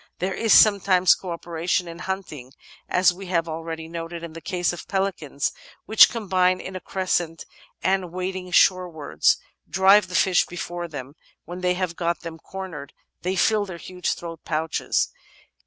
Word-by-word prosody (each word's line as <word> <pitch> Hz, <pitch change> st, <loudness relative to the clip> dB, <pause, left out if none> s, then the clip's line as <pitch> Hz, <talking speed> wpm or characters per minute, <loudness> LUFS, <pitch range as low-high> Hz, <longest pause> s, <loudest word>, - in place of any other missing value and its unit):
There 190 Hz, +1 st, -2 dB
is 225 Hz, +2 st, 0 dB
sometimes 195 Hz, -3 st, +6 dB
co 185 Hz, -, -7 dB
operation 170 Hz, +1 st, -2 dB
in 170 Hz, 0 st, -8 dB
hunting 155 Hz, -9 st, -6 dB, 0.4 s
as 180 Hz, 0 st, +4 dB
we 190 Hz, +1 st, -9 dB
have 170 Hz, -2 st, 0 dB
al 160 Hz, 0 st, -4 dB
ready 160 Hz, -1 st, -6 dB
noted 165 Hz, 0 st, -6 dB
in 165 Hz, -2 st, -7 dB
the 165 Hz, -, -9 dB
case 180 Hz, -1 st, -1 dB
of 175 Hz, -, -9 dB
pelicans, 190 Hz, -8 st, -1 dB, 0.3 s
which 220 Hz, -, +7 dB
combine 185 Hz, -5 st, +1 dB
in 190 Hz, -, -7 dB
a -, -, -3 dB
crescent 175 Hz, -3 st, -2 dB, 0.4 s
and, 185 Hz, -2 st, +1 dB
wading 185 Hz, 0 st, -4 dB
shorewards, 175 Hz, -4 st, +3 dB, 0.3 s
drive 190 Hz, +1 st, +5 dB
the 180 Hz, -, -7 dB
fish 180 Hz, +1 st, +3 dB
before 175 Hz, 0 st, -5 dB
them; 140 Hz, -4 st, -8 dB, 0.3 s
when 175 Hz, +2 st, -7 dB
they 180 Hz, 0 st, +1 dB
have 180 Hz, -2 st, -2 dB
got 170 Hz, 0 st, -1 dB
them 165 Hz, -1 st, -8 dB
cornered 180 Hz, -8 st, -8 dB, 0.3 s
they 185 Hz, +2 st, -1 dB
fill 210 Hz, +2 st, +2 dB
their 180 Hz, -2 st, -7 dB
huge 180 Hz, +1 st, -3 dB
throat 165 Hz, -1 st, -8 dB
pouches. 160 Hz, 0 st, 0 dB
180 Hz, 165 wpm, -24 LUFS, 165-190 Hz, 0.4 s, which